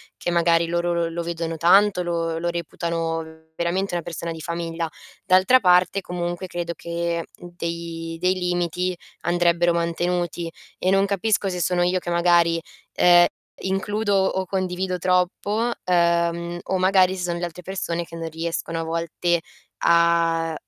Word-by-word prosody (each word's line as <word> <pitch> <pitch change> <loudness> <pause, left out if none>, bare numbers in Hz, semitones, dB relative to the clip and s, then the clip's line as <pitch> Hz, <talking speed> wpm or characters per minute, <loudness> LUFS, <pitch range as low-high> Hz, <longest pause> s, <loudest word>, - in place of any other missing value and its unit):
che - - -4
magari 170 -1 +3
loro 170 0 0
lo 170 -1 0
lo 170 +1 -4
vedono 165 -1 -3
tanto, 185 +3 +4
lo 165 -1 -1
lo 170 +1 -1
reputano 165 -1 -4
veramente 175 +2 -1
una 170 - -2
persona 170 0 -5
di 160 - -7
famiglia. 170 0 -3 0.4
D'altra 190 +7 +5
parte 180 0 +4
comunque 175 0 -4
credo 175 -1 -4
che 170 0 -3
dei 170 -1 -6
dei 180 +2 +2
limiti 180 0 -1 0.3
andrebbero 175 0 +2
mantenuti 170 0 -1 0.3
e 185 - +1
non 195 +1 +4
capisco 200 0 +1
se 180 -1 -3
sono 175 +1 +1
io 180 +1 +2
che 175 -1 -4
magari, 170 -1 +3 0.3
ehm, 175 0 +6 0.4
includo 205 +2 -1
o 190 -1 +1
condivido 185 -1 -2
troppo, 190 +6 +1
ehm, 170 -1 +1
o 190 - -1
magari 185 0 +4
se 180 - -5
son 175 -1 -1
le 175 - -2
altre 175 +1 -9
persone 175 -2 -3
che 165 - -11
non 165 -1 -5
riescono 165 0 -3
a - - -2
volte 170 +1 -1 0.4
a, 170 -1 +3
175 Hz, 150 wpm, -23 LUFS, 170-180 Hz, 0.4 s, ehm